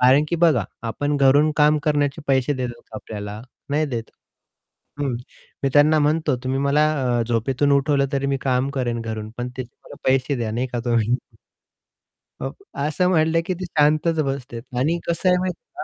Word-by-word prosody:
कारण 130 Hz, +4 st, +5 dB
की 170 Hz, -, 0 dB
बघा 160 Hz, -, +3 dB, 0.2 s
आपण 145 Hz, +6 st, -1 dB
घरून 140 Hz, +3 st, +5 dB
काम 150 Hz, 0 st, +4 dB
करण्याचे 145 Hz, 0 st, 0 dB
पैसे 135 Hz, +1 st, +2 dB
देतात 125 Hz, -2 st, -4 dB
का 110 Hz, -, -7 dB
आपल्याला? 105 Hz, 0 st, -7 dB, 0.3 s
नाही 155 Hz, +2 st, +1 dB
देत. 120 Hz, -5 st, -5 dB, 0.9 s
हं, 135 Hz, -4 st, 0 dB, 0.5 s
मी 135 Hz, -, +2 dB
त्यांना 150 Hz, +2 st, +5 dB
म्हणतो, 150 Hz, -1 st, +1 dB
"तुम्ही 130 Hz, +1 st, 0 dB
मला 140 Hz, +2 st, +3 dB, 0.4 s
अ, -, -, +2 dB
झोपेतून 130 Hz, +5 st, +1 dB
उठवलं 140 Hz, 0 st, +3 dB
तरी 140 Hz, 0 st, 0 dB
मी 140 Hz, 0 st, +1 dB
काम 130 Hz, 0 st, +1 dB
करेन 120 Hz, -4 st, -2 dB
घरून 110 Hz, -1 st, -5 dB
पण 120 Hz, 0 st, -2 dB
त्याचे 125 Hz, -2 st, -6 dB
मला -, -, -11 dB
पैसे 135 Hz, +1 st, +2 dB
द्या 115 Hz, -3 st, -2 dB
नाही 125 Hz, +3 st, -1 dB
का" 120 Hz, -, -1 dB
"तुम्ही." 115 Hz, 0 st, +2 dB, 1.3 s
अ, -, -, -2 dB, 0.4 s
असं 180 Hz, +4 st, +1 dB
म्हटलं 165 Hz, -2 st, +3 dB
की 185 Hz, -, -1 dB
ते -, -, -3 dB
शांतच 155 Hz, 0 st, +2 dB
बसतात 130 Hz, -2 st, -5 dB
आणि 160 Hz, +7 st, +1 dB
कसं 170 Hz, +2 st, +1 dB
आहे 180 Hz, -, +5 dB
माहिती 180 Hz, -1 st, -3 dB
आहे 360 Hz, +1 st, -8 dB
140 Hz, 180 wpm, -22 LUFS, 125-150 Hz, 1.3 s, कारण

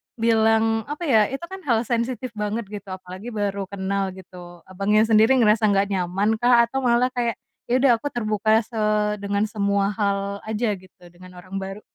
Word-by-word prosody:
bilang 225 Hz, 0 st, +2 dB
apa 295 Hz, +4 st, -5 dB
ya, 220 Hz, -9 st, +4 dB
itu 270 Hz, +5 st, -6 dB
kan 385 Hz, -, -6 dB
hal 230 Hz, -2 st, +2 dB
sensitif 240 Hz, +1 st, -2 dB
banget 210 Hz, +1 st, -3 dB
gitu 205 Hz, -1 st, -8 dB
apalagi 185 Hz, +2 st, -8 dB
baru 200 Hz, -2 st, -2 dB
kenal 195 Hz, -1 st, -3 dB
gitu, 175 Hz, -2 st, -13 dB
Abangnya 200 Hz, +3 st, +1 dB
sendiri 220 Hz, +3 st, +4 dB
ngerasa 220 Hz, -3 st, +4 dB
enggak 200 Hz, 0 st, +1 dB
nyaman 195 Hz, +4 st, 0 dB
kah, 240 Hz, 0 st, +5 dB
atau 235 Hz, +3 st, -2 dB
malah 250 Hz, 0 st, +2 dB
kayak, 240 Hz, -2 st, -1 dB, 0.3 s
"Ya 240 Hz, -, +1 dB
udah 270 Hz, -, +6 dB
aku 290 Hz, -, -4 dB
terbuka 215 Hz, 0 st, +1 dB
se 225 Hz, 0 st, -7 dB, 0.4 s
dengan 200 Hz, +1 st, -1 dB
semua 200 Hz, -2 st, 0 dB
hal 200 Hz, -1 st, -2 dB
aja 220 Hz, 0 st, -1 dB
gitu 185 Hz, -1 st, -22 dB
dengan 180 Hz, +1 st, -15 dB
orang 185 Hz, +2 st, -7 dB
baru."? 195 Hz, +2 st, -7 dB
210 Hz, 175 wpm, -23 LUFS, 195-230 Hz, 0.4 s, udah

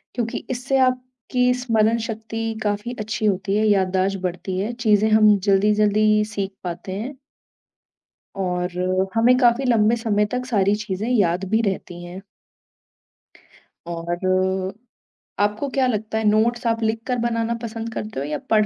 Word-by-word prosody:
क्योंकि 235 Hz, -2 st, -2 dB
इससे 255 Hz, +2 st, -1 dB
आपकी 255 Hz, 0 st, -1 dB
स्मरण 225 Hz, -1 st, +2 dB
शक्ति 225 Hz, 0 st, -4 dB
काफ़ी 210 Hz, +3 st, -2 dB
अच्छी 215 Hz, +1 st, -3 dB
होती 195 Hz, -1 st, 0 dB
है, 215 Hz, -, +2 dB
याददाश्त 190 Hz, -1 st, +2 dB
बढ़ती 185 Hz, +1 st, -3 dB
है, 210 Hz, +5 st, -2 dB
चीज़ें 220 Hz, -3 st, +2 dB
हम 215 Hz, -1 st, +6 dB
जल्दी-जल्दी 210 Hz, +2 st, +3 dB
सीख 195 Hz, -2 st, -2 dB
पाते 175 Hz, +1 st, -5 dB
हैं। 260 Hz, +5 st, -6 dB, 1.2 s
और 180 Hz, -2 st, -1 dB, 0.4 s
हमें 235 Hz, +2 st, +5 dB
काफ़ी 245 Hz, +1 st, +3 dB
लंबे 230 Hz, -2 st, +3 dB
समय 215 Hz, -3 st, +1 dB
तक 250 Hz, 0 st, -2 dB
सारी 205 Hz, -5 st, +2 dB
चीज़ें 205 Hz, +2 st, -3 dB
याद 190 Hz, -6 st, +2 dB
भी 220 Hz, +1 st, +3 dB
रहती 190 Hz, -4 st, -3 dB
हैं। 175 Hz, +2 st, -8 dB, 1.7 s
और 185 Hz, +3 st, -1 dB, 0.7 s
आपको 210 Hz, +6 st, 0 dB
क्या 265 Hz, 0 st, +1 dB
लगता 220 Hz, -2 st, -2 dB
है 220 Hz, -, -1 dB
नोट्स 235 Hz, +3 st, +1 dB
आप 230 Hz, 0 st, 0 dB
लिखकर 225 Hz, +3 st, -1 dB
बनाना 230 Hz, 0 st, 0 dB
पसंद 225 Hz, 0 st, -5 dB
करते 215 Hz, -8 st, -5 dB
हो 140 Hz, -, -3 dB
या 150 Hz, 0 st, -2 dB
पढ़ 215 Hz, -1 st, +4 dB
215 Hz, 140 wpm, -22 LUFS, 195-230 Hz, 1.7 s, हम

